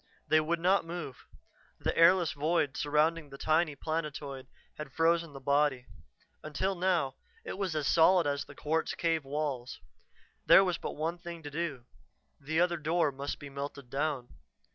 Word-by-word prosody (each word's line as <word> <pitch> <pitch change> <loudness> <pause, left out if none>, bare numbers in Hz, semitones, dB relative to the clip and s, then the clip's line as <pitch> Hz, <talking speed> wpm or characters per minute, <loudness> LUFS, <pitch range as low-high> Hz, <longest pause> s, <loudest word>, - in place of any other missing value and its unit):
They 155 - +5
would 160 +2 0
not 185 +3 +3
move; 165 -6 -7 0.5
the - - -1
airless 170 0 +5
void 150 -1 0
surrounding 150 +1 +1
the 140 - -10
tiny 155 0 +1
planetoid 145 -3 -4 0.3
had 145 -3 -6
frozen 165 0 +1
the 135 - -8
body 140 -2 +1 0.6
until 155 +6 -2
now 175 -7 0 0.3
it - - -5
was 190 -4 -2
as 150 -2 -1
solid 170 +3 +5
as 140 -1 -1
the - - -13
quartz 160 +2 -1
cave 165 -2 0
walls. 135 -3 -3 0.6
There 195 - +8
was 180 -2 -1
but - - -5
one 165 +3 -2
thing 170 -2 -8
to 145 - -7
do: 145 -6 -3 0.5
the 160 +4 -1
other 175 -1 +2
door 160 0 +1
must 140 +1 -5
be 145 -1 -10
melted 140 -2 -7
down. 140 -3 -2
155 Hz, 165 wpm, -31 LUFS, 140-170 Hz, 0.6 s, There